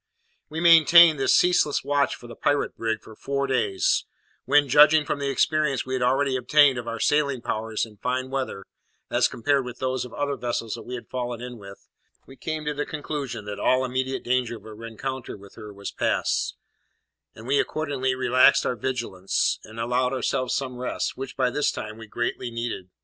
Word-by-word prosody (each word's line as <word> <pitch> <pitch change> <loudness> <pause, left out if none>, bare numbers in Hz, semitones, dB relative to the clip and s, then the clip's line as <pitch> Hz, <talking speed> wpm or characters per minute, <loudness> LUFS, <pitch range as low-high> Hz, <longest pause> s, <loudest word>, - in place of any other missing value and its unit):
We 155 +1 -5
maintained 165 -1 +7
this 135 - +3
ceaseless 175 -5 +3
watch 140 +1 +1
for - - -15
the 120 - -10
pirate 145 0 0
brig 110 -1 -2
for 110 - -13
four 140 +3 -2
days, 115 -8 +1 0.4
when, 145 +2 +4
judging 150 +3 +6
from 145 - -2
the 140 -1 -1
experience 150 0 +1
we 130 - -5
had 130 - -1
already 135 +2 +2
obtained 135 +1 +4
of 120 - -8
our 115 - -4
sailing 140 -1 +1
powers 110 0 -2
in 105 -2 -16
fine 130 +3 -2
weather 130 -8 -3 0.5
as - - +3
compared 140 +3 0
with 125 -1 -8
those 130 0 -2
of 125 - -9
other 145 -1 -2
vessels 115 -2 -3
that - - -8
we 125 - -4
had 120 - -9
fallen 120 -2 -4
in 125 -1 -8
with, 100 -1 -13 0.4
we 135 - -14
came 155 +1 -5
to 150 - -1
the 145 0 -2
conclusion 145 -8 -5
that 105 0 -6
all 130 0 +2
immediate 130 +1 -2
danger 125 -2 0
of - - -18
a 110 - -9
rencontre 115 +3 -6
with 100 0 -15
her 105 -2 -10
was 100 0 -7
past; - - 0 0.8
and 110 - -12
we 140 +3 +2
accordingly 135 -4 -1
relaxed 130 0 +4
our 125 - 0
vigilance, 115 -6 -1
and 110 +1 -11
allowed 125 +2 0
ourselves 130 0 -1
some 130 -2 -4
rest, 125 - -3
which, 135 +1 -7
by 125 -1 +2
this 145 +3 +1
time, 110 +1 -7
we 115 - -10
greatly 120 +2 -3
needed. 115 -5 -5
130 Hz, 195 wpm, -25 LUFS, 115-140 Hz, 0.8 s, maintained